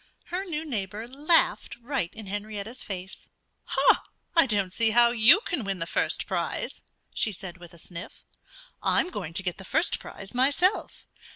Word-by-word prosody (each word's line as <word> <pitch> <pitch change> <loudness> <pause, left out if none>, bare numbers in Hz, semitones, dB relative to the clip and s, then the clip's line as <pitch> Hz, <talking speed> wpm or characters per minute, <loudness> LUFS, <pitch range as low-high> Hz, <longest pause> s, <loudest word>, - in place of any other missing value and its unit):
Her 375 +2 -1
new 320 -3 -3
neighbor 215 -4 -3
laughed 295 +6 +2
right 245 -7 -2
in 220 -1 -8
Henrietta's 205 +4 -5
face. 190 -1 -7 1.1
"I 330 -4 +6
don't 200 -5 0
see 225 +2 +2
how 235 +1 +5
you 240 - +7
can 350 - -2
win 195 -2 -2
the 165 - -1
first - - 0
prize," - - -2 0.3
she 215 - +2
said 185 -2 -8
with 175 -1 -13
a - - -15
sniff. 170 +3 -10 0.6
"I'm 360 - +2
going 175 - -5
to 190 - -2
get 180 0 -3
the - - -7
first 320 - +1
prize 195 0 -10
myself. 285 +10 +1
220 Hz, 165 wpm, -27 LUFS, 190-275 Hz, 1.1 s, you